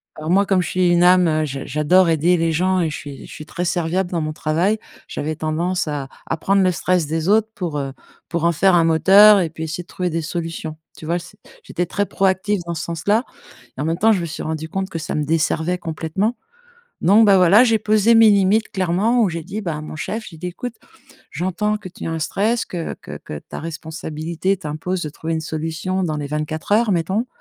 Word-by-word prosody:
Alors 155 +1 -6
moi, 200 +2 +4
comme 190 -2 +2
je 170 - -3
suis 185 -1 +2
une 175 0 +4
âme, 175 -4 +4
je 135 -2 -5
j'adore 150 +6 +3
aider 165 +3 +3
les 165 -1 +1
gens 185 +3 +1
et 165 - 0
je 150 - -5
suis 140 -2 -9
je - - -13
suis 155 - -9
très 170 +3 -4
serviable 175 +1 0
dans 170 -2 -1
mon 155 0 -3
travail, 165 +8 0 0.3
j'avais 155 +2 -4
tendance 160 +3 -1
à 145 -3 -4 0.2
à - - -1
prendre 195 +4 +2
le 185 - +3
stress 180 -1 0
des 160 +3 -1
autres 220 +1 +3
pour 170 -6 -3
heu, 135 -1 -4 0.3
pour 170 -1 -3
en 170 - +4
faire 185 +3 +3
un 170 - +4
moteur 195 +6 +7
et 170 -3 0
puis 160 0 -7
essayer 160 +2 -4
de - - -34
trouver 180 -1 -3
des 165 0 -2
solutions. 165 -1 -4 0.2
Tu - - -10
vois? 170 +2 0
C'est 180 +4 -14 0.3
j'étais 175 - -2
très 205 +4 -1
proactive 195 +1 0
dans 170 - -3
ce 165 0 -4
sens-là 200 +8 0 0.5
et - - -6
en - - -1
même 165 +2 -1
temps, 220 +2 +4
je 195 - +1
me 170 - -3
suis 160 - -6
rendu 160 0 -4
compte 190 +3 -3
que 165 - -4
ça 155 - -5
me 150 - 0
desservait 165 +3 0
complètement. 170 +7 -2 0.7
Donc 205 +6 +6
bah, 200 -2 +6
voilà, 185 +6 +6
j'ai 225 -2 +3
posé 215 +1 +3
mes 225 -1 +7
limites 200 +2 +3
clairement 195 +6 +1
où 200 - +2
j'ai 165 -1 -5
dit 195 +5 -5
bah, 170 -6 -3
à 150 - -6
mon 155 - -8
chef, 220 +8 -4
j'ai 165 - -13
dit: 180 - -5
«Écoute, 235 +7 -6 0.6
j'entends 200 +4 -1
que 205 -3 -9
tu 180 - -8
as - - -2
un 165 - -2
stress 215 +8 0
que 170 -3 -5
que - - -10
que 75 - -8
ta - - -9
responsabilité 160 +3 -3
t'impose 175 +2 -4
de 155 - -3
trouver 165 +3 -4
une 160 - -1
solution 160 +4 -3
dans 155 -4 -1
les 145 -1 -4
24 150 +4 -3
heures 220 +1 +3
mettons 190 +7 0
175 Hz, 235 wpm, -20 LUFS, 160-195 Hz, 0.7 s, moteur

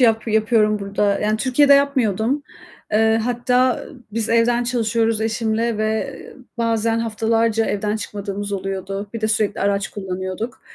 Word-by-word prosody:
yap 225 -2 +3
yapıyorum 215 -1 +2
burada, 200 0 0
yani 215 +1 +1
Türkiye'de 275 +4 +4
yapmıyordum. 270 -2 +1 0.5
Eee, 220 +1 +3
hatta 250 +1 +1 0.3
biz 225 0 -1
evden 235 +1 +2
çalışıyoruz 230 -2 0
eşimle 225 0 -1
ve 220 +5 -1 0.4
bazen 230 0 +1
haftalarca 225 0 +1
evden 210 +1 -1
çıkmadığımız 205 -1 -5
oluyordu. 195 +1 -4
Bir 230 - -4
de 215 - 0
sürekli 215 -2 0
araç 200 0 0
kullanıyorduk 190 +3 -5
220 Hz, 130 wpm, -21 LUFS, 205-230 Hz, 0.5 s, Türkiye'de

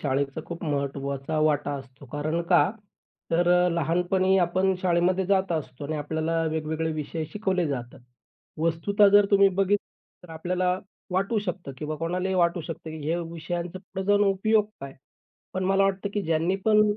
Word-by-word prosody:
शाळेचा 135 +1 -1
खूप 170 0 -7
महत्त्वाचा 140 0 -2
वाटा 145 -1 +1
असतो. 135 +1 -14
कारण 155 +3 -1
का? 175 +1 +5 0.6
तर 175 +1 +2 0.2
अ, - - +3
लहानपणी 180 +4 +2
आपण 185 +2 +1
शाळेमध्ये 180 +1 +2
जात 190 -2 +2
असतो 145 -4 -4
आणि 155 +2 -3
आपल्याला 160 +2 -1
वेगवेगळे 160 +1 -2
विषय 155 +1 -4
शिकवले 190 -5 0
जातात. 130 -1 -5 0.6
वस्तुतः 185 +6 +3
जर 205 0 +6
तुम्ही 200 -1 +6
बघितली 195 +1 -2
तर - - -15
आपल्याला 180 +3 0 0.3
वाटू 195 +5 +1
शकतं 175 -6 -4
किंवा 155 +2 -4
कोणालाही 180 +4 -1
वाटू 175 -1 +2
शकतं, 160 0 -7
की 160 - -6
ह्या 165 +2 +1
विषयांचा 170 +2 -5
पुढे 190 0 -6
जाऊन 205 0 +4
उपयोग 210 +2 +3 0.2
काय? 135 0 -8 0.6
पण 185 0 -2
मला 195 +1 +3
वाटतं, 195 +1 0
की 205 - 0
ज्यांनी 165 +3 +1
पण 215 -1 +5
170 Hz, 160 wpm, -26 LUFS, 155-190 Hz, 0.6 s, जर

